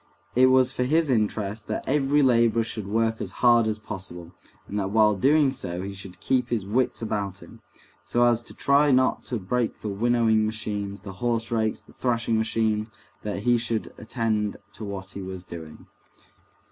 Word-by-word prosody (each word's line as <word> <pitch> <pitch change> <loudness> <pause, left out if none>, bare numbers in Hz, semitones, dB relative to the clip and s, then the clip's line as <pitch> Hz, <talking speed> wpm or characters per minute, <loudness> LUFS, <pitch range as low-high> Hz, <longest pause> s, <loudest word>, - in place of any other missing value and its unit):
It 130 +1 +6
was 130 0 +4
for 130 - -4
his 155 +3 +2
interests 105 -2 0
that 110 - -4
every 145 +1 +3
laborer 115 -2 +4
should 110 -3 -5
work 115 +2 0
as - - -3 0.2
hard 120 -2 +6
as 110 -1 -1
possible, 95 -5 -8 0.4
and 105 - -3
that 95 -1 -1
while 105 0 +4
doing 140 +7 +4
so 90 -8 -5
he 100 0 -5
should 95 -2 -10
keep 125 -2 0
his 110 -5 -1
wits 120 +3 0
about 100 -3 -3
him, - - -15 0.4
so 120 - +1
as 120 -1 +3
to - - -11
try 140 +1 +3
not 130 -1 +3
to 125 - -2
break 115 +4 -2
the 105 - -3
winnowing 110 +1 +2
machines, 105 -2 -3
the 100 -2 -7
horse 115 -2 0
rakes, 110 -2 0
the - - -20
thrashing 115 -2 0
machines, 110 -1 0 0.3
that 100 -2 -4
he 120 0 +3
should 115 -1 -2
attend 110 -3 -1 0.2
to - - -8
what 100 -1 -6
he 100 - -7
was 95 -1 -6
doing. 80 -3 -10
110 Hz, 185 wpm, -25 LUFS, 100-120 Hz, 0.4 s, It